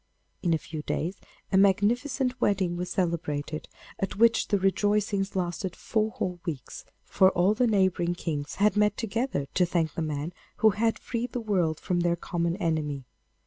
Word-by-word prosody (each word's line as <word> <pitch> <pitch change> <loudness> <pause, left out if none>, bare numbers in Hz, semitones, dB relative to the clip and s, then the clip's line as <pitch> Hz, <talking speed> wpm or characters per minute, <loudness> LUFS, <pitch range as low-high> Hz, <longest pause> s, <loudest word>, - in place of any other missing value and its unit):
In 175 - +1
a 160 - +4
few 155 0 -7
days 170 +5 -2 0.3
a 190 - +4
magnificent 245 +7 +2
wedding 190 -5 +2
was 180 +1 -3
celebrated, 160 -4 -2 0.3
at 195 - -2
which 230 +2 +4
the 205 - +2
rejoicings 200 +1 +1
lasted 180 0 -2
four 220 -1 0
whole 180 -4 -3
weeks, 150 -9 -6 0.2
for 190 - +4
all 185 +3 +3
the 245 +3 +2
neighbouring 190 -4 +2
kings 150 -4 -3
had 210 0 +3
met 210 -1 +3
together 225 - -1
to 180 - +3
thank 170 -3 0
the - - -3
man 155 +2 -3 0.2
who 220 - +5
had 225 +3 +1
freed 240 0 -4
the 245 - -1
world 180 -8 0
from 180 -1 -1
their 170 0 +2
common 170 0 -2
enemy. 155 -7 -1
185 Hz, 170 wpm, -27 LUFS, 170-210 Hz, 0.3 s, who